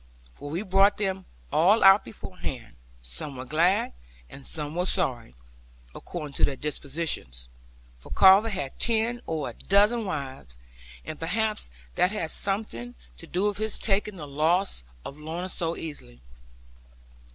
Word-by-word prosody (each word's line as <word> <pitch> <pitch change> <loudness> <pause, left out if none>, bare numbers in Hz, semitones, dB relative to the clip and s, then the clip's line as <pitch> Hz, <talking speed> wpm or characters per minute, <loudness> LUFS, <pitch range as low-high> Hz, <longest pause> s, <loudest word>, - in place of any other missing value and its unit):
For 145 - -8
we 170 +7 -2
brought 195 +1 +4
them 190 -2 -1 0.3
all 195 +8 +5
out 195 +1 +8
beforehand; 135 - -7 0.3
some 60 - -6
were 130 - -6
glad, 165 - +2 0.4
and 140 - -11
some 150 0 -3
were 180 +2 0
sorry; 125 - 0 0.6
according 150 -5 -6
to - - -2
their 140 - +3
dispositions. 140 - -4 0.5
For - - -13
Carver 195 +4 +7
had 140 -10 -4
ten 235 +1 +1
or 155 -6 -2
a - - -15
dozen 210 - +3
wives; 135 - -5 0.5
and 155 - -6
perhaps 210 - -1 0.2
that 180 - +3
had 165 -7 -2
something 195 - -3 0.2
to - - -11
do 185 +3 0
with 205 -1 -1
his 220 0 -1
taking 205 0 0
the 155 -5 -7
loss 160 - +1 0.2
of 140 - -7
Lorna 165 +4 -4
so 170 -2 -2
easily. 145 - -7
170 Hz, 145 wpm, -27 LUFS, 140-195 Hz, 0.6 s, out